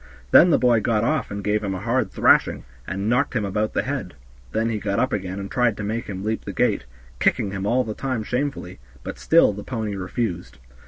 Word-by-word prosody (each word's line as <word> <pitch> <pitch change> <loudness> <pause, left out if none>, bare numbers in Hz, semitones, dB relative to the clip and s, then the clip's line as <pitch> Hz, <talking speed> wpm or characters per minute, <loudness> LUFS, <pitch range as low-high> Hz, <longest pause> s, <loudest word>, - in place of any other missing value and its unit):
Then 180 - +8
the - - +5
boy 120 -3 +4
got 110 0 +1
off 145 0 0
and 100 0 -5
gave 105 +1 0
him 95 -2 -2
a - - -4
hard 120 +6 0
thrashing, - - +3 0.2
and 100 +2 -3
knocked 125 +4 +1
him 110 -4 0
about 105 +2 -1
the - - 0
head; 130 - -4 0.4
then 110 +1 0
he 110 - -2
got 100 -1 -2
up 130 +3 +1
again 95 -2 -3
and 100 0 -6
tried 120 -3 +1
to 105 - -4
make 110 +3 -3
him 95 -1 -5
leap 110 +1 -2
the - - -5
gate, - - +1 0.3
kicking 100 - +1
him 100 0 -3
all 125 +4 +2
the 110 -2 -4
time 130 -2 -3
shamefully, 125 - -3 0.2
but - - -7
still 165 -10 +4
the 105 +1 -7
pony 110 -5 -3
refused. 90 - -4
110 Hz, 225 wpm, -23 LUFS, 100-125 Hz, 0.4 s, Then